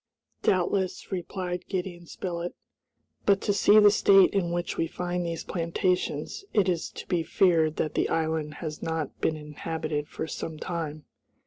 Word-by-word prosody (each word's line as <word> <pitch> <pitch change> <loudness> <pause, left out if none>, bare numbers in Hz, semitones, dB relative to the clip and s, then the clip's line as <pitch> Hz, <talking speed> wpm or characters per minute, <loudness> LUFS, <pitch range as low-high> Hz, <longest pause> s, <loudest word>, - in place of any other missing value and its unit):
"Doubtless," 185 +1 0
replied 180 -1 -4
Gideon 180 -3 -4
Spilett, 175 -1 -4 0.7
"but 200 -1 +5
to 205 - +1
see 205 +1 +5
the 210 -1 +8
state 195 -2 +6
in 190 -4 +1
which 175 0 -2
we 165 - 0
find 180 +1 -2
these 165 -1 -3
plantations, 180 - -1
it 205 -3 +3
is 175 -3 0
to - - -9
be 175 -2 +1
feared 160 -2 +3
that 155 - -1
the - - +1
island 160 -2 -1
has 155 -2 -6
not 160 -3 -3
been 155 - +1
inhabited 150 0 -4
for - - -5
some 160 0 -5
time." 155 -3 -4
170 Hz, 155 wpm, -27 LUFS, 160-185 Hz, 0.7 s, the